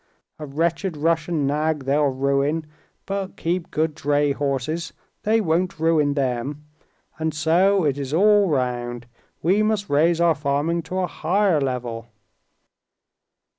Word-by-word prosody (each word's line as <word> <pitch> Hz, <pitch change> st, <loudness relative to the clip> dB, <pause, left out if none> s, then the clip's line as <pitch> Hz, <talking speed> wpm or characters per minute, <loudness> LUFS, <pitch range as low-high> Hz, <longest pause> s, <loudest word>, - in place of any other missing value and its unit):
A 150 Hz, -, -6 dB
wretched 165 Hz, +4 st, -1 dB
Russian 165 Hz, -1 st, 0 dB
nag 150 Hz, +1 st, 0 dB
they'll 145 Hz, +2 st, +2 dB
ruin, 140 Hz, +4 st, 0 dB, 0.4 s
but 195 Hz, -1 st, -4 dB
keep 170 Hz, +1 st, -2 dB
good 155 Hz, 0 st, 0 dB
dray 145 Hz, 0 st, +1 dB
horses—they 155 Hz, -, -2 dB
won't 175 Hz, -1 st, 0 dB
ruin 155 Hz, -3 st, +2 dB
them. 135 Hz, +2 st, -2 dB, 0.5 s
And 160 Hz, -1 st, -2 dB
so 175 Hz, +5 st, +3 dB
it 145 Hz, -2 st, 0 dB
is 135 Hz, -1 st, -4 dB
all 205 Hz, +3 st, +4 dB
round. 120 Hz, -3 st, -2 dB, 0.4 s
We 190 Hz, +6 st, +3 dB
must 215 Hz, -3 st, 0 dB
raise 165 Hz, +4 st, +3 dB
our 170 Hz, -1 st, +4 dB
farming 145 Hz, +4 st, -1 dB
to 185 Hz, -, -3 dB
a -, -, +1 dB
higher 180 Hz, 0 st, +1 dB
level." 120 Hz, -4 st, -3 dB
155 Hz, 130 wpm, -23 LUFS, 140-170 Hz, 0.5 s, all